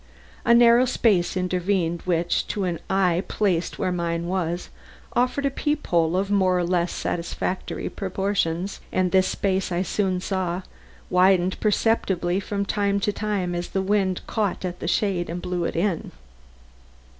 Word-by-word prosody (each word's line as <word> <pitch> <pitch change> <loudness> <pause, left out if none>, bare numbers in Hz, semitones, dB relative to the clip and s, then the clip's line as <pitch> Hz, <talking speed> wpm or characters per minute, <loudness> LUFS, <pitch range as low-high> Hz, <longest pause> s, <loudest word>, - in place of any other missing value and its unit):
A 235 -1 +6
narrow 235 +1 +6
space 205 -8 +2
intervened 180 -2 0
which, 175 -1 0
to 205 - -2
an 175 -3 -2
eye 185 -2 +2
placed 185 -5 0
where 185 - 0
mine 170 -1 -2
was, 175 -1 -2 0.4
offered 255 +3 +1
a 275 - +1
peep 295 +2 -1
hole 170 0 +2
of 195 +1 -1
more 190 -2 +3
or 180 - +1
less 175 0 +1
satisfactory 175 +2 -3
proportions, 190 -2 -2
and 185 -1 +1
this 190 -1 +4
space, 190 -1 -1
I 175 +1 0
soon 190 0 0
saw, 185 -1 -2 0.5
widened 185 0 +3
perceptibly 195 -4 +1
from 200 0 -2
time 200 -1 0
to 205 +1 0
time 200 -4 -2
as 175 0 -3
the 190 - -1
wind 190 -2 +1
caught 205 -4 -1
at 180 -1 -4
the - - -4
shade 180 -2 0
and 170 +2 -3
blew 180 -1 -2
it - - -3
in. 175 0 -1
185 Hz, 155 wpm, -24 LUFS, 175-200 Hz, 0.5 s, A